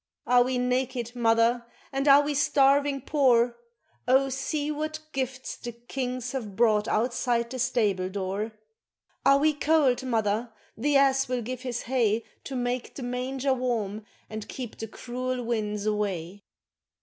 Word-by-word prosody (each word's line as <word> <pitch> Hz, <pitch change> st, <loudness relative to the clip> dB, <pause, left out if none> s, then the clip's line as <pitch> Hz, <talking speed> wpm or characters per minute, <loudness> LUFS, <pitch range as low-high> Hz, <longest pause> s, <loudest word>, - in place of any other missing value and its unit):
Are 245 Hz, 0 st, +5 dB
we 255 Hz, 0 st, -1 dB
naked, 250 Hz, -1 st, -1 dB
mother, 230 Hz, 0 st, +3 dB, 0.3 s
and 275 Hz, +1 st, -1 dB
are 280 Hz, +1 st, +8 dB
we 295 Hz, +1 st, -1 dB
starving 280 Hz, 0 st, +3 dB
poor 245 Hz, -4 st, +3 dB, 0.5 s
Oh, 265 Hz, +2 st, +4 dB
see 290 Hz, +3 st, -2 dB
what 310 Hz, +1 st, -3 dB
gifts 260 Hz, -1 st, -4 dB
the 240 Hz, -1 st, -7 dB
kings 250 Hz, +1 st, -4 dB
have 220 Hz, -7 st, -5 dB
brought 215 Hz, -2 st, +3 dB
outside 235 Hz, 0 st, 0 dB
the 260 Hz, -, -5 dB
stable 210 Hz, -7 st, +1 dB
door, 200 Hz, +3 st, -3 dB, 0.7 s
Are 275 Hz, -, +6 dB
we 305 Hz, +2 st, +3 dB
cold, 290 Hz, -4 st, +2 dB
mother, 225 Hz, -2 st, 0 dB, 0.2 s
the 285 Hz, +6 st, 0 dB
ass 270 Hz, -1 st, +3 dB
will 250 Hz, -1 st, -2 dB
give 250 Hz, +2 st, -5 dB
his 250 Hz, -2 st, -4 dB
hay 230 Hz, -3 st, +1 dB, 0.2 s
To 270 Hz, -, -5 dB
make 245 Hz, 0 st, -2 dB
the 270 Hz, -, -6 dB
manger 255 Hz, +2 st, -1 dB
warm 225 Hz, -5 st, -2 dB, 0.2 s
and 215 Hz, -1 st, -7 dB
keep 250 Hz, -4 st, -6 dB
the 225 Hz, -, -4 dB
cruel 250 Hz, +3 st, -4 dB
winds 210 Hz, -3 st, -2 dB
away. 200 Hz, -3 st, -2 dB
250 Hz, 150 wpm, -27 LUFS, 225-270 Hz, 0.7 s, are